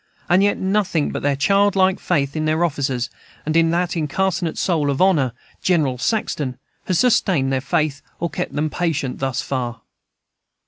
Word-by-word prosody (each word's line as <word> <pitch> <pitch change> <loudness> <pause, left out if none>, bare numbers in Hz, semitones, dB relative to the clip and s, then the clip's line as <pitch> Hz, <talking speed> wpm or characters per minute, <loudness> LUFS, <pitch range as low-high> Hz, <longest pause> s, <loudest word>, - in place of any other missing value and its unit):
And 175 +2 +4
yet 205 0 +2
nothing 190 -5 0
but - - -4
their 145 0 +1
childlike 195 +4 +3
faith 140 -5 0
in 155 0 -1
their 155 +2 +2
officers, 135 -6 -2 0.3
and 155 +1 -1
in 165 0 +4
that 175 +1 0
incarnate 175 +2 -1
soul 160 -6 +1
of 140 - -1
honor, 165 -10 +3 0.3
General 150 -9 +1
Saxton, 140 - -1 0.3
has 185 - +1
sustained 190 - +2
their 130 - 0
faith, 140 +1 -1 0.2
or 170 - 0
kept 180 +1 -4
them 150 +1 -1
patient, 160 -7 -2
thus 135 -2 -1
far. 120 -4 -3
155 Hz, 165 wpm, -21 LUFS, 140-185 Hz, 0.3 s, And